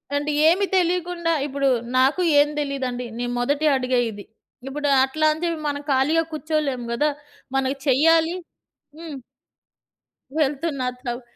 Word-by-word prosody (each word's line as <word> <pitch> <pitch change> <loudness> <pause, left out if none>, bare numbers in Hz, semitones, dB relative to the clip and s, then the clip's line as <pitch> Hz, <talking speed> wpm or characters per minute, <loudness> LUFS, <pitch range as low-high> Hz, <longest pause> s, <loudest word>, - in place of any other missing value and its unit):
అంటే 290 +1 -1 0.2
ఏమి 370 +5 +4
తెలియకుండా 350 -1 0 0.2
ఇప్పుడు 280 0 -1 0.3
నాకు 270 +7 +3 0.2
ఏం 290 - +5
తెలీదండి. 265 -4 -3
నేను 245 0 -3
మొదటి 285 +5 0
అడుగే 255 -1 +1
ఇది. 205 -1 -10 0.4
ఇప్పుడు 290 +2 -3 0.2
అట్లా 310 +4 0
అని 315 - -9
చెప్పి 335 -2 -2
మనం 285 0 -3
ఖాళీగా 290 +5 +3
కూర్చోలేం 305 -5 -2
గదా! 295 +6 +1 0.5
మనకి 270 +1 0
చెయ్యాలి 325 +5 +4 0.6
హ్మ్. 325 -3 -7 1.2
వెళ్తున్నట్లవు. 265 -4 -2
285 Hz, 120 wpm, -23 LUFS, 260-320 Hz, 1.2 s, ఏం